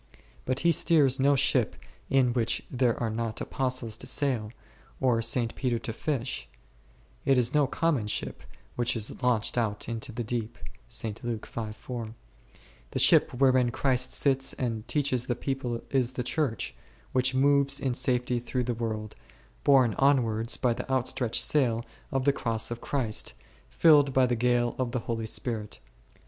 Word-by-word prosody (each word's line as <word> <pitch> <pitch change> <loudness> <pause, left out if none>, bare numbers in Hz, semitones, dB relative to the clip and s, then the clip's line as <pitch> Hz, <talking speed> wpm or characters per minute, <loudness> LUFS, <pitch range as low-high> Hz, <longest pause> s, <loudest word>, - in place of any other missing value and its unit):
But 130 +1 -1
He 170 - +4
steers 145 -5 +3
no 140 +1 +4
ship 130 -4 +2 0.3
in 130 -3 +3
which 120 -2 0
there 125 -2 +1
are 115 -2 -1
not 115 0 -3
Apostles 130 -4 -1
to - - -6
sail, 125 -7 0 0.5
or 125 -3 +2
St. 115 +1 +1
Peter 125 -3 -1
to 115 0 -5
fish; 135 0 -3 0.7
it 135 -1 +3
is 125 +1 +2
no 150 -2 +3
common 145 -7 0
ship - - -3 0.3
which 120 0 0
is 110 -2 -4
launched 120 -1 +1
out 105 -3 -2
into 115 0 -5
the 120 +2 -4
deep 120 +1 -4 0.3
h; 115 - 0
the 115 0 -6 0.8
ship - - +6
wherein 130 -1 +3
Christ 130 0 +1
sits 135 -1 +2
and 115 -3 -3
teaches 135 -4 0
the 120 - 0
people 125 -2 -3
is 130 -2 +1
the 125 - -3
Church, 120 - -2 0.4
which 130 0 +2
moves 140 +1 +3
in 130 -2 -1
safety 125 0 0
through 125 +1 -2
the 120 0 -1
world, 110 -2 -4 0.5
borne 130 -5 +5
onwards 115 -5 +2
by 125 -2 +1
the 135 - -6
out 130 -1 +1
stretched 120 -3 0
sail 120 -6 +1 0.3
of 135 -1 -1
the 140 - +4
Cross 115 -4 -2
of 120 - -5
Christ, 120 -7 -2 0.3
filled 145 -5 +4
by 130 -1 +5
the 125 -1 0
gale 120 0 +1
of 125 -2 -2
the 125 - -1
Holy 115 -1 -3
Spirit. 110 -3 -2
125 Hz, 160 wpm, -28 LUFS, 115-135 Hz, 0.8 s, ship